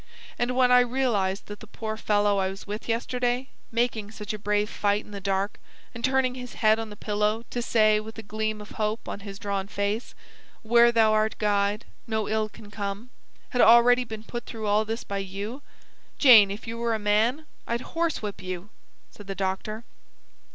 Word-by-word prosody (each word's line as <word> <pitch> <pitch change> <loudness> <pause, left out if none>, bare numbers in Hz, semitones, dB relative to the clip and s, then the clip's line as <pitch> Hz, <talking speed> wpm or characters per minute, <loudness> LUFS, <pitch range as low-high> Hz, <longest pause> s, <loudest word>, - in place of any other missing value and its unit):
And 245 +1 0
when 250 -1 +4
I 250 - +8
realise 235 -6 +1
that 205 -1 -10
the 220 - -12
poor 220 0 -5
fellow 205 -2 +2
I 190 0 +1
was 195 +1 -8
with 210 +3 -6
yesterday 245 +2 -1 0.2
making 230 -3 0
such 215 0 -6
a 215 - -5
brave 210 +1 +1
fight 205 0 0
in - - -14
the 200 -1 -7
dark, 195 +1 -1 0.3
and 230 - -8
turning 260 -1 +2
his 250 -1 -8
head 220 0 +3
on 225 -1 -4
the 210 - -9
pillow 210 +2 -1
to 245 - -2
say 215 -2 +3
with 220 +1 -9
a 225 - -7
gleam 215 +1 -3
of 210 - -11
hope 215 0 -2
on - - -5
his 200 -1 -8
drawn 200 -2 -3
face: 205 +3 -2 0.5
`Where 235 +1 +6
Thou 220 -2 +4
art 215 0 +1
Guide, 205 0 +1 0.2
no 220 -2 -1
ill 215 0 0
can 205 0 -14
come' 205 +3 -5 0.4
had 245 - +2
already 240 +2 +7
been 220 -2 -8
put 240 +1 -6
through 220 -2 -6
all 210 +1 +2
this 225 +2 -4
by 200 0 -4
you 200 +7 -5 0.6
Jane, 225 -8 +8
if 200 +2 -6
you 230 0 -5
were 235 -1 0
a - - 0
man, 220 +8 +1 0.2
I'd 235 +1 -1
horsewhip 320 - -2
you!" 185 +2 -6 0.4
said 205 - -13
the 195 - -4
doctor. 195 +4 -3
215 Hz, 195 wpm, -26 LUFS, 205-235 Hz, 0.6 s, I